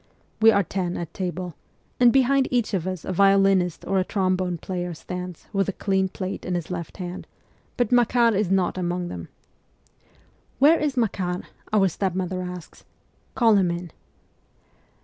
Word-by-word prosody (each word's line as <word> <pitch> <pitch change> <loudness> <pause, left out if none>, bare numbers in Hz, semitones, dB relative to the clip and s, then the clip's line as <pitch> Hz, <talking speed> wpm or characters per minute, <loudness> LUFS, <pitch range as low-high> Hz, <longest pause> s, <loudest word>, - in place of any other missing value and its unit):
We 225 - +8
are 200 -2 +4
ten 180 0 -3
at 170 -2 -6
table, 180 -1 -4 0.5
and 245 -1 +7
behind 270 +1 +3
each 240 -3 0
of 185 -2 -1
us 185 -4 -4
a 185 - -2
violinist 195 -2 +3
or 195 0 +1
a - - +2
trombone 185 -2 0
player 175 0 -4
stands, 180 +1 -7
with 195 -1 +1
a - - -2
clean 190 -1 0
plate 185 0 -5
in 180 - -2
his 175 0 -4
left 170 -2 -5
hand; 180 0 -6 0.5
but 245 -3 +1
Makar 240 -1 +4
is 200 -2 0
not 185 -1 +1
among 175 0 -2
them. 85 -2 -7 0.7
' - - -35
Where 305 +5 +5
is 290 -3 -1
Makar? 185 -6 -1
' - - -27
our 205 -3 +4
stepmother 185 0 -2
asks. 180 -2 -8 0.3
' - - -39
Call 225 -4 +5
him 185 -3 +2
in.' 170 -1 -4
185 Hz, 170 wpm, -24 LUFS, 180-210 Hz, 0.7 s, We